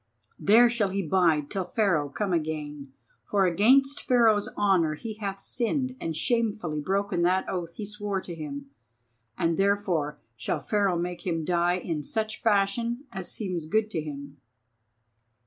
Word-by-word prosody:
There 230 +4 +6
shall 235 -4 +1
he 195 +1 -1
bide 160 -4 +2
till 195 -2 -1
Pharaoh 180 -7 +1
come 195 +5 -2
again; 150 -4 -3 0.3
for 195 - +2
against 260 +11 +4
Pharaoh's 225 -5 +3
honour 180 -7 +3
he 220 +8 -6
hath 195 -2 -4
sinned 255 +4 -1
and 165 -1 -3
shamefully 215 -6 0
broken 195 +2 0
that 185 +2 +2
oath 170 -2 -4
he 215 - -5
swore 205 -1 -3
to 175 - -7
him, 140 -3 -7 0.7
and 165 0 +1
therefore 195 -7 +1 0.2
shall 115 +2 -2
Pharaoh 200 -4 +1
make 175 +1 -4
him 165 -3 -1
die 175 0 +2
in 165 -4 -3
such 220 +7 -3
fashion 230 +4 +1
as 190 -2 -5
seems 180 -7 -3
good 215 +5 +1
to 165 - -1
him." 140 -1 -8
190 Hz, 150 wpm, -27 LUFS, 160-210 Hz, 0.7 s, There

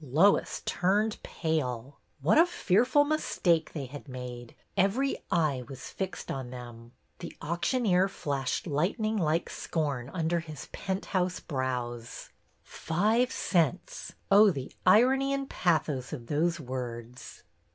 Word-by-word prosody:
Lois 155 +9 +3
turned 210 +4 +1
pale. 140 - -3 0.2
What 175 - +4
a 340 - +7
fearful 250 - +3
mistake 180 - +1
they 145 -4 -4
had 145 +3 -10
made! 125 -2 -8 0.2
Every 210 +9 +2
eye 150 -7 +1
was 135 -1 -8
fixed 190 -1 -4
on 130 -2 -4
them. 120 -1 -10 0.3
The 170 - -8
auctioneer 180 - +1
flashed 140 -8 -2
lightning 190 - 0
like 165 -3 +1
scorn 140 -6 -2
under 170 +1 0
his 155 -3 -9
penthouse 185 -1 -2
brows. 125 -4 -4 0.2
" - - -40
Five 220 +9 +1
cents! 175 0 0
" - - -39
Oh, 205 +2 +8
the 135 -8 -4
irony 265 +7 +5
and 275 0 -3
pathos 155 - 0
of 125 -6 -6
those 165 +6 0
words! 125 -2 -7
165 Hz, 130 wpm, -29 LUFS, 130-195 Hz, 0.3 s, Oh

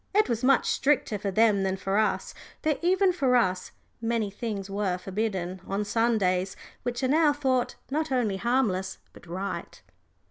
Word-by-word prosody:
It 425 - +5
was 235 -1 -2
much 265 0 +4
stricter 270 -7 +1
for 200 0 -2
them 210 0 +3
than 190 0 0
for 195 +2 0
us, 215 - 0 0.3
though 310 -1 +2
even 370 +2 +3
for 270 -7 +2
us 185 -6 +1 0.3
many 225 -3 0
things 205 -2 -4
were 195 -2 -1
forbidden 190 -2 -3
on 200 +2 -1
Sundays 200 -4 +1 0.3
which 245 +1 -3
are - - +3
now 300 +2 +4
thought 260 -4 0 0.2
not 310 +1 -1
only 230 -7 +1
harmless 210 -5 0 0.2
but - - -15
right. 185 +4 -5
220 Hz, 165 wpm, -27 LUFS, 195-260 Hz, 0.3 s, It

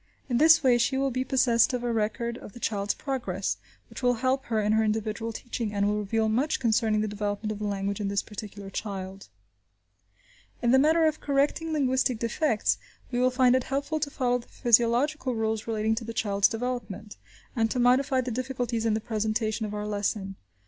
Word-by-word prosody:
In 245 -2 +1
this 320 0 +6
way 245 -2 +4
she 265 +3 +1
will 270 0 +1
be 255 +1 -1
possessed 255 -3 +3
of 245 -1 -2
a 240 -1 -1
record 230 +2 -1
of 200 - -11
the - - -11
child's 205 -3 -1
progress, 200 - -3 0.3
which - - -10
will 245 0 +3
help 260 +3 0
her 225 -2 0
in 210 0 +1
her 220 0 +3
individual 220 +1 -2
teaching, 230 -1 -4
and 200 0 +2
will 210 0 0
reveal 220 +2 0
much 260 +8 +1
concerning 220 -3 +2
the 215 - -1
development 205 +1 -3
of 210 - -5
the 210 - -2
language 200 0 -2
in 200 - -1
this 200 0 0
particular 205 -2 -8
child. 195 -1 -6 1.3
In 240 - +2
the 265 - +6
matter 320 +3 +4
of 310 -1 +1
correcting 290 +3 0
linguistic 260 -4 +1
defects, 230 +1 0 0.3
we 245 - -1
will 255 0 +4
find 255 -1 +4
it 260 - 0
helpful 280 +3 -2
to 295 -1 -2
follow 245 -3 0
the 235 - -14
physiological 245 +4 +2
rules 220 -1 -2
relating 220 -1 0
to 225 +2 -3
the 230 0 -6
child's 200 -2 +2
development, 225 -3 -5 0.4
and 225 -2 +1
to 255 - -2
modify 255 +2 +3
the 255 0 -4
difficulties 245 -2 -2
in 215 - +2
the 220 - -2
presentation 220 0 -1
of 210 - -7
our 210 0 -3
lesson. 205 -1 -2
230 Hz, 200 wpm, -27 LUFS, 210-255 Hz, 1.3 s, this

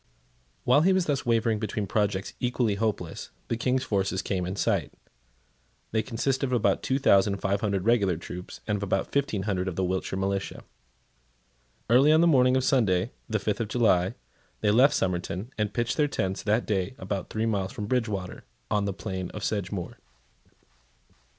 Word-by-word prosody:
While 130 +4 +5
he 190 +4 +4
was 185 -2 +2
thus 140 -5 -1
wavering 115 -2 +2
between 105 -1 -2
projects 100 0 -1
equally 120 -3 +1
hopeless, 100 -5 -3 0.2
the - - +1
King's 125 +2 0
forces 95 -4 -1
came 90 -3 -2
in 95 - -3
sight. - - 0 1.0
They 110 - +1
consisted 130 +3 -1
of 130 - -3
about 100 -5 +2
two 135 - 0
thousand 100 -6 +4
five 100 +1 -1
hundred 100 -3 -1
regular 100 -7 +3
troops, 90 +2 -8
and 105 -1 0
of - - -7
about 95 -1 -1
fifteen 135 -8 0
hundred 95 -2 -1
of 95 - -3
the 95 - -1
Wiltshire 95 +1 -2
militia. 95 0 -2 1.2
Early 130 +6 +5
on 160 +1 +5
the - - +5
morning 130 -5 +4
of 130 - 0
Sunday, 110 -7 +2 0.2
the 110 - +1
fifth 105 +2 -2
of 115 - -2
July, 105 -3 +2 0.5
they 105 - +3
left 130 +6 +5
Somerton, 90 +4 -2
and 105 -2 -1
pitched 120 +2 -1
their 150 -2 +3
tents 95 -8 -2
that 110 +3 +1
day 100 +2 -1
about 95 0 -4
three 110 +1 -1
miles 100 -4 -1
from 105 - -5
Bridgewater, 105 -6 -2 0.3
on 105 -1 +1
the 100 - -1
plain 95 -2 -5
of 105 - -6
Sedgemoor. 100 -3 -3
105 Hz, 175 wpm, -27 LUFS, 95-120 Hz, 1.2 s, While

